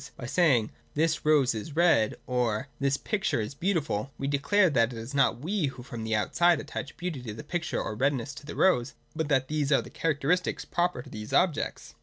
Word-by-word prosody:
By 120 - -7
saying 135 -5 +3
' - - -35
This 160 +1 +1
rose 145 -5 +4
is 115 +7 -6
red,' 160 -11 +4
or 125 0 -1
' - - -36
This 140 0 +2
picture 200 - -1
is 110 +5 -3
beautiful,' 145 - -1
we 135 - -4
declare, 165 +8 +3
that 115 -3 +3
it 120 - -7
is 115 +4 -7
not 135 -3 +2
we 180 0 0
who 130 -2 -7
from 115 -4 -6
outside 170 +10 +3
attach 140 - -6
beauty 175 -7 -4
to 110 -4 -6
the 150 - -8
picture 175 +2 -2
or - - -3
redness 135 +3 0
to 145 - -11
the - - -6
rose, 140 -9 +2 0.2
but 160 -1 -1
that 135 -3 +2
these 150 -1 -1
are 140 - +4
the - - -12
characteristics 165 +3 0
proper 175 -8 -1
to - - -13
these 105 0 -7
objects. 180 -5 0
140 Hz, 215 wpm, -28 LUFS, 125-165 Hz, 0.2 s, rose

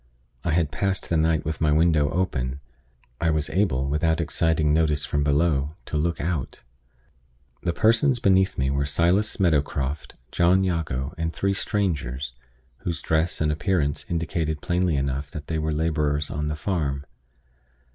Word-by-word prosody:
I - - -1
had 80 -3 +1
passed 95 +6 -1
the 85 - +1
night 80 0 +2
with 80 +2 -3
my 75 -1 +3
window 75 -2 +3
open; 70 -7 -1 0.6
I 85 - +1
was 75 -2 0
able, 80 -9 +1
without 80 +3 +1
exciting 80 -1 +1
notice 75 -2 +2
from 75 0 0
below, 75 0 +1
to - - -6
look 85 +3 0
out. 80 -4 -3 1.0
The 85 - 0
persons 115 - +3
beneath 95 -3 +3
me 65 +1 +1
were 70 +1 0
Silas 85 +9 +1
Meadowcroft, 75 -4 0 0.2
John 90 +2 +3
Jago, 80 -6 -2
and 80 0 -1
three 100 +3 0
strangers, 75 -11 -2 0.5
whose 85 -3 -3
dress 80 +2 0
and 75 -1 +2
appearance 75 -1 0
indicated 80 -2 -1
plainly 90 0 0
enough 70 +1 -2
that 75 0 -7
they 80 0 -2
were 80 0 -1
laborers 75 -2 0
on 75 +1 -2
the 75 - -2
farm. 75 -5 -2
80 Hz, 155 wpm, -25 LUFS, 75-85 Hz, 1.0 s, my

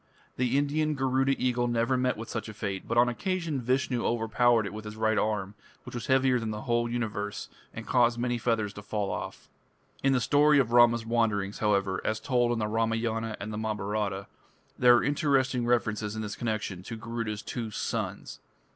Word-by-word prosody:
The 125 +1 +1
Indian 150 +2 +1
Garuda 135 0 +1
eagle 125 -1 +1
never 120 +2 +1
met 125 -2 0
with 115 +1 -7
such - - -4
a 110 - -9
fate, 100 -3 -4
but 115 - -1
on 120 - +7
one - - 0
occasion 170 - -2
Vishnu 125 0 0
overpowered 115 0 +2
it 100 - -5
with 110 0 -7
his 105 0 -8
right 110 0 +1
arm, 105 -2 -1 0.3
which - - -10
was 120 - -5
heavier 130 -1 +3
than 115 -1 -3
the 105 0 -4
whole 120 -2 0
universe, 105 -4 -3 0.2
and - - -8
caused 120 -1 +3
many 120 0 -1
feathers 110 -4 0
to 105 - -9
fall 105 -1 -2
off. - - -6 0.5
In 135 - +3
the 130 - +3
story 145 +3 +4
of 125 -5 +2
Rama's 120 -1 +5
wanderings, 110 -4 0
however, 100 -3 +1
as 110 0 -1
told 120 +1 +1
in 120 - 0
the 105 -1 -1
Ramayana 115 0 -1
and 105 +2 -5
the 105 - -3
Mahabharata, 105 -2 -2 0.5
there 125 -1 +6
are 120 - +2
interesting 135 -4 +1
references 110 -3 0
in 110 - -3
this 105 -1 -5
connection 110 -5 -3
to 115 +5 -7
Garuda's 115 -2 -4
two 115 -2 -4
"sons". 105 - -4
115 Hz, 195 wpm, -28 LUFS, 105-125 Hz, 0.5 s, on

